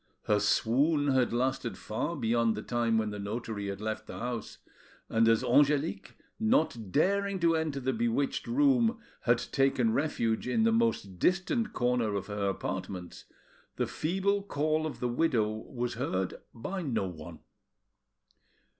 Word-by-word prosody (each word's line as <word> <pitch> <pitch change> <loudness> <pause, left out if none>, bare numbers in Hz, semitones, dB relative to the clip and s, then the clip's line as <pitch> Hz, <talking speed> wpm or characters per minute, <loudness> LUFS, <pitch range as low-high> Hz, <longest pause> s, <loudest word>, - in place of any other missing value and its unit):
Her 105 -1 +2
swoon 140 +8 +2
had 130 -2 +2
lasted 120 -4 -1
far 125 +13 -3
beyond 115 -2 +1
the 105 - -5
time 120 -2 +1
when 110 -1 0
the 105 - -6
notary 105 0 -4
had 100 0 -4
left 110 0 -4
the - - -7
house; 120 -2 -4 0.5
and 115 0 +3
as 115 +1 +4
Angelique, 145 +5 +2 0.2
not 220 - +1
daring 200 - +1
to 165 -1 +4
enter 160 -3 -1
the 130 0 -1
bewitched 120 +4 0
room, 245 -3 +3 0.3
had 120 -1 +4
taken 130 -3 +1
refuge 120 -6 0
in 220 - +2
the 225 - +4
most 225 - 0
distant 195 - +1
corner 120 -4 +1
of 100 - -2
her 105 -1 -1
apartments, 95 -2 -5 0.5
the - - 0
feeble 195 +5 0
call 155 -3 0
of 125 -6 -8
the 125 - +1
widow 120 -4 +1
was 120 +3 -4
heard 95 -7 -2 0.2
by 185 +12 -5
no 125 - -1
one. 80 -2 -9
125 Hz, 150 wpm, -30 LUFS, 110-155 Hz, 0.5 s, as